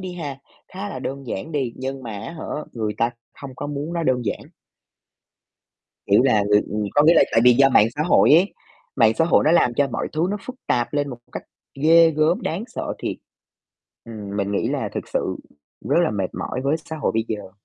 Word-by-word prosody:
đi 185 -1 -6
ha, 145 -6 -5 0.3
khá 195 +2 -6
là 130 - -6
đơn 135 +1 -6
giản 115 +7 -5
đi 135 -5 -1
nhưng 135 +1 -5
mà 120 - -6
á 105 +8 -7
hả, 160 - -8 0.3
người 110 -3 -3
ta 115 +1 +2 0.3
không 135 -2 -8
có 145 - -5
muốn 145 +3 -4
nó 170 - -2
đơn 130 -5 +1
giản. 105 - -2 1.7
Kiểu 100 +4 +4
là, 110 -6 +3 0.2
người 105 -1 -3
có 145 - +5
nghĩa 165 - +6
là - - +6
tại 115 - +4
vì 125 - +8
do 135 +2 +5
mạng 110 -3 +5
xã 150 - -1
hội 165 - +4
ấy, 180 +5 +4 0.4
mạng 115 -4 +4
xã 165 - +2
hội 165 - +3
nó 155 - +3
làm 125 -8 +3
cho 140 +3 +2
mọi 125 - -3
thứ 160 +3 +1
nó 205 - -2
phức 255 - -8
tạp 120 +2 0
lên 145 -1 0
một 125 - -7
cách - - -6 0.4
ghê 165 +1 +6
gớm, 160 +7 +1
đáng 180 +2 -3
sợ - - -5
thiệt. - - -3 0.9
Ừm, 105 -3 -7
mình 100 0 -1
nghĩ 100 - 0
là - - -2
thực - - -4
sự - - -2 0.5
rất 145 - +3
là 165 - 0
mệt 95 -3 -2
mỏi 130 - -4
với 140 +3 +1
xã 160 - -6
hội 150 - 0
bây 110 0 -1
giờ. 105 -3 -5
135 Hz, 225 wpm, -22 LUFS, 115-160 Hz, 1.7 s, vì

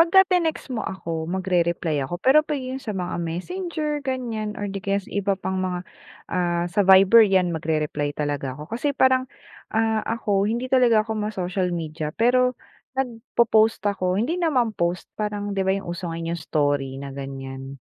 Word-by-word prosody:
pagka-tinext 350 -4 +3
mo 230 - -2
ako 165 -3 -4
magrereply 175 -4 0
ako 175 - -3
pero 265 +11 +5
pag 305 -1 -3
'yun 260 0 -5
sa 215 -6 -5
mga 180 -1 -3
Messenger 300 - -3
ganyan 235 -6 -3
or 205 - -4
di 195 -1 -4
kaya 200 0 0
sa 200 - -6
iba 200 -1 0
pang 190 0 -3
mga, 180 -1 -2 0.5
ah, 175 -1 +1
sa 205 - +2
Viber 195 +3 +7
yan 190 -4 +4
magrereply 150 -2 -1
talaga 145 -3 -2
ako 150 +8 -10
kasi 280 +4 -1
parang, 260 0 +3 0.5
ah, 220 -1 +2
ako 205 -3 +1
hindi 245 +3 -2
talaga 235 -4 +5
ako 225 - -3
ma-social 185 -3 -1
media 155 -3 -4
pero 250 +2 +3 0.4
nag-popost 225 -4 +2
ako 185 -2 0
hindi 315 - 0
naman 255 -10 +2
post 175 -1 -1 0.2
parang 205 -1 -2
'di 195 - -1
ba 190 - +4
yung 175 -3 -5
uso 175 0 -5
ngayon 165 +1 -3
story 145 -4 0
na 140 0 -7
ganyan. 135 0 -7
195 Hz, 170 wpm, -24 LUFS, 170-240 Hz, 0.5 s, Viber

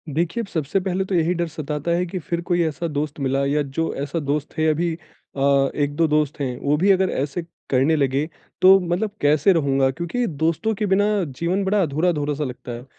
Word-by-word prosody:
देखिए, 170 +8 0
अब - - -9
सबसे 160 0 -1
पहले 190 0 -1
तो 190 - -2
यही 170 +1 +2
डर 170 -1 -1
सताता 155 0 -4
है 175 +1 +1
कि 180 +1 -5
फिर 170 +2 -3
कोई 175 -1 +3
ऐसा 160 +1 -2
दोस्त 150 -1 -3
मिला 135 0 0
या 145 +2 +1
जो 145 +3 -2
ऐसा 145 +4 -3
दोस्त 145 0 -3
है 160 0 +2
अभी 165 +2 0
अ, 140 -4 -1
1-2 145 +3 +1
दोस्त 150 -1 0
हैं, 125 -3 -2
वो 145 +1 +1
भी 195 +6 +4
अगर 190 -1 +3
ऐसे 140 +5 -2 0.3
करने 135 +4 +3
लगे 140 0 +1 0.4
तो 190 +1 +8
मतलब 180 +4 -1
कैसे 150 +6 +4
रहूँगा? 135 -5 +2
क्योंकि 170 - -2
दोस्तों 165 +8 0
के 210 - -1
बिना 200 +1 +3 0.3
जीवन 180 +4 0
बड़ा 200 +1 +2
अधूरा-अधूरा 150 -2 0
सा 150 - -2
लगता 125 -2 -6
है। 120 +1 -7
160 Hz, 210 wpm, -22 LUFS, 140-175 Hz, 0.4 s, तो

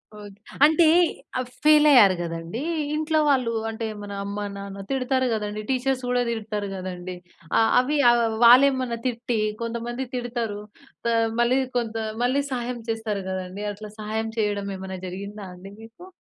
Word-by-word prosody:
Okay. 205 -1 -11 0.3
అంటే 320 +2 +5 0.5
ఆహ్, 255 - -3 0.2
fail 305 0 +6
అయ్యారు 205 -9 +7
కదండీ! 165 +6 -5 0.3
ఇంట్లో 310 0 +1
వాళ్ళు 255 -4 +2 0.2
అంటే, 225 +1 -4 0.2
మన 205 0 -8
అమ్మ-నాన్న 200 -1 -6
తిడతారు 260 0 +1
కదండీ. 210 -1 -3
టీచర్స్ 260 0 0
కూడా 250 0 +2
తిడతారు 215 -3 -3
కదండీ. 185 -1 -6 0.4
ఆహ్, 225 - +4
అవ్వి 280 +4 +1
ఆహ్, 240 0 +4 0.2
వాళ్ళేమన్నా 255 0 +5
తిట్టి 235 -1 -2 0.2
కొంతమంది 235 +2 -3
తిడతారు. 235 -4 -3 0.5
త - - +1 0.3
మళ్ళీ 240 +2 +3 0.2
కొంత 230 -2 -2 0.3
మళ్ళీ 260 +3 +2
సహాయం 245 -1 -3
చేస్తారు 220 -3 -3
కదండీ! 190 +1 -5
అట్లా 210 +1 -9
సహాయం 220 +1 -3
చేయడం 205 -2 -1
ఏమన్నా 190 0 -7
జరిగిందా 200 +3 -7
అండి 190 +2 -11
మీకు? 230 +11 -13
225 Hz, 140 wpm, -24 LUFS, 200-250 Hz, 0.5 s, అయ్యారు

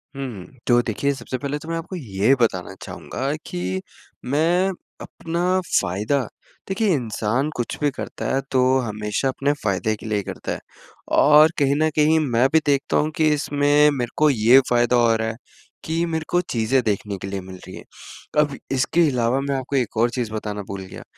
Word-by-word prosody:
हुँ। 125 -9 -6 0.2
तो 120 -1 +5
देखिए, 135 +5 -1
सबसे 130 -1 -5
पहले 145 +1 -3
तो 160 - -10
मैं 165 - -1
आपको 165 +3 -6
ये 110 - +1
बताना 95 -5 0
चाहूँगा 135 +2 -4
कि 95 +1 -3 0.4
मैं 165 +8 +2 0.3
अपना 175 +3 -1 0.2
फ़ायदा 105 +8 -1 0.4
देखिए, 200 +3 0
इंसान 120 +2 -1
कुछ 120 - -3
भी 145 - +3
करता - - -6
है, - - +2
तो 130 0 +3
हमेशा 105 +4 -2
अपने 140 +2 0
फ़ायदे 110 +2 0
के 105 - -13
लिए 105 -1 -1
ही 100 - -2
करता - - -6
है - - -3 0.6
और 150 +2 +7
कहीं 140 -1 +3
न 155 - +3
कहीं 155 +1 +4
मैं 130 -4 +2
भी 160 - +6
देखता 140 -1 +1
हूँ 155 +1 +1
कि 160 -3 +3
इसमें 145 0 +3
मेरे 125 -4 -3
को 155 0 +5
ये 120 +1 +6
फ़ायदा 120 0 +3
हो 120 -2 +4
रहा 110 0 -1
है 110 - -3 0.5
कि 165 +2 0
मेरे 160 -1 -3
को 175 - +2
चीज़ें 125 -4 0
देखने 105 -2 -2
के 95 - -7
लिए 95 -1 -4
मिल 95 0 -10
रही 95 - -9
हैं। - - -10 0.6
अब 145 -2 +2 0.2
इसके 135 +6 +2
अलावा 125 0 +1
मैं 140 0 -1
आपको 135 +1 -3
एक 125 -4 -1
और 120 +2 +3
चीज़ 120 -3 -3
बताना 105 -1 -4
भूल 100 -1 -5
गया। - - -10
130 Hz, 195 wpm, -22 LUFS, 110-150 Hz, 0.6 s, और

